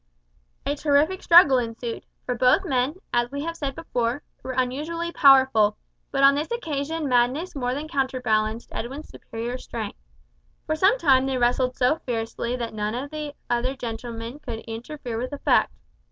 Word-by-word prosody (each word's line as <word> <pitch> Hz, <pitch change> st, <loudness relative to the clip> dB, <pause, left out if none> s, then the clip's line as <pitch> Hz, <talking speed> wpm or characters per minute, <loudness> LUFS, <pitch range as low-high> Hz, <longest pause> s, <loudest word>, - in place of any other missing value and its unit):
A 285 Hz, -, 0 dB
terrific 295 Hz, +5 st, +2 dB
struggle 330 Hz, -7 st, +7 dB
ensued, 230 Hz, 0 st, -5 dB, 0.2 s
for 250 Hz, -, -1 dB
both 250 Hz, +10 st, +3 dB
men, 265 Hz, -1 st, 0 dB, 0.2 s
as 240 Hz, 0 st, +2 dB
we 280 Hz, +1 st, -4 dB
have 335 Hz, +1 st, -4 dB
said 280 Hz, -4 st, -4 dB
before, 250 Hz, -4 st, -2 dB, 0.2 s
were 260 Hz, -, -5 dB
unusually 300 Hz, +7 st, -2 dB
powerful; 260 Hz, -8 st, +5 dB, 0.3 s
but 275 Hz, 0 st, 0 dB
on 275 Hz, 0 st, +8 dB
this 295 Hz, +3 st, -2 dB
occasion 315 Hz, -7 st, -2 dB
madness 255 Hz, +8 st, +1 dB
more 250 Hz, -2 st, -1 dB
than 295 Hz, +3 st, -4 dB
counterbalanced 245 Hz, -6 st, 0 dB
Edwin's 270 Hz, +6 st, -6 dB
superior 235 Hz, +3 st, -6 dB
strength. 220 Hz, -5 st, -6 dB, 0.7 s
For 310 Hz, -, 0 dB
some 385 Hz, +9 st, +4 dB
time 270 Hz, -, +4 dB
they 265 Hz, -1 st, 0 dB
wrestled 250 Hz, +1 st, +1 dB
so 260 Hz, +5 st, +3 dB
fiercely 235 Hz, 0 st, -3 dB
that 235 Hz, -3 st, -4 dB
none 210 Hz, +1 st, -2 dB
of 275 Hz, +4 st, -5 dB
the 300 Hz, -1 st, -5 dB
other 245 Hz, +3 st, 0 dB
gentlemen 230 Hz, +1 st, -6 dB
could 235 Hz, -6 st, -6 dB
interfere 235 Hz, +1 st, -6 dB
with 255 Hz, +4 st, -4 dB
effect. 285 Hz, -, +2 dB
260 Hz, 160 wpm, -24 LUFS, 240-295 Hz, 0.7 s, on